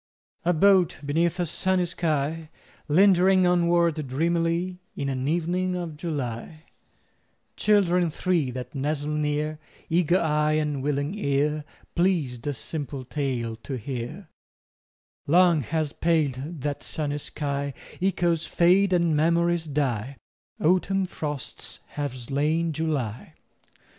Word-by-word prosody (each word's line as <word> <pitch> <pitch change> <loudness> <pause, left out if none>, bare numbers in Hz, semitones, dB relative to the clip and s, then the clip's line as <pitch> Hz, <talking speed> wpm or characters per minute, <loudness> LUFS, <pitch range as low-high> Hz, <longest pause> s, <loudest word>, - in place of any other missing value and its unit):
A 175 - +3
boat 185 +1 +4
beneath 165 +4 +1
a 175 - +1
sunny 185 +2 +1
sky, 160 -2 -2 0.4
Lingering 185 +2 +5
onward 170 -3 +2
dreamily 170 +5 0 0.2
In 140 - -2
an 130 0 -2
evening 175 +3 0
of 170 -3 -4
July— 150 -1 -5 0.9
Children 180 -5 +3
three 165 -3 0
that 125 0 -6
nestle 145 +1 -2
near, 150 0 -1 0.3
Eager 175 +1 +3
eye 150 -1 +2
and 150 -3 0
willing 145 +3 -1
ear, 150 -5 0 0.3
Pleased 155 -9 0
a 145 - 0
simple 140 -2 -5
tale 125 -5 -2
to 130 +4 -6
hear— 130 - -6 1.0
Long 170 0 +5
has 155 +2 -2
paled 155 -2 0
that 145 +1 -2
sunny 145 -1 -3
sky: 140 -1 -3 0.3
Echoes 175 -3 +1
fade 185 +3 +4
and 170 -3 +3
memories 170 +2 +2
die. 135 -3 -1 0.4
Autumn 185 +3 +2
frosts 150 -6 -5
have 145 -3 -4
slain 150 +6 0
July. 140 -8 -3
155 Hz, 115 wpm, -26 LUFS, 140-175 Hz, 1.0 s, Lingering